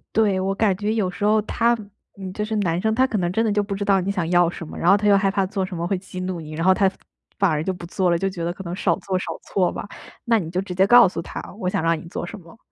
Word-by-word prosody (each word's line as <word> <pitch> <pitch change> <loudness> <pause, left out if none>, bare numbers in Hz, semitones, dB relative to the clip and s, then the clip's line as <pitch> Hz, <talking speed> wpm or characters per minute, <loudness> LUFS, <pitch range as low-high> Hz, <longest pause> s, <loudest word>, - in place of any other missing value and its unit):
对， 205 -4 +3
我 195 +1 -1
感 205 -3 +2
觉 210 +3 -1
有 210 -5 0
时 180 +3 -7
候 215 +1 +4
他 235 +2 +2 0.4
嗯， 190 -1 -7
就 210 - -3
是 220 +1 -3
男 180 -3 0
生 220 0 +1
他 260 +2 +4
可 220 - -2
能 175 -1 0
真 225 +4 +1
的 220 - +1
就 205 0 +2
不 200 -1 -4
知 200 +1 -3
道 195 -2 +3
你 195 +2 -1
想 185 -5 -2
要 175 -1 +4
什 170 -2 -8
么， - - -9
然 170 - +2
后 200 - +7
他 210 - 0
又 200 -1 +6
害 195 0 +2
怕 195 0 +1
做 190 0 -2
什 185 - -7
么 170 - -2
会 190 +1 0
激 185 0 -9
怒 185 -2 -3
你， 155 0 -9
然 165 +2 -2
后 190 - +6
他 195 0 +3 0.5
反 195 -2 +3
而 155 0 0
就 190 - -1
不 175 -1 -9
做 185 +1 0
了， 170 - +3
就 195 - -1
觉 170 -3 -6
得 170 - -1
可 190 +2 -8
能 175 0 -5
少 185 -3 +1
做 190 -2 -2
少 - - -5 0.2
错 185 -3 0
吧。 - - -6 0.4
那 230 -1 +3
你 165 -5 -5
就 180 - -2
直 185 -2 -6
接 190 +2 +3
告 240 -2 +8
诉 175 - -4
他： - - -7 0.2
“我 180 - -1
想 160 - -1
让 165 0 +2
你 - - -11
做 175 - -5
什 200 - -8
么， 170 +1 -16
190 Hz, 350 characters per minute, -22 LUFS, 175-205 Hz, 0.5 s, 告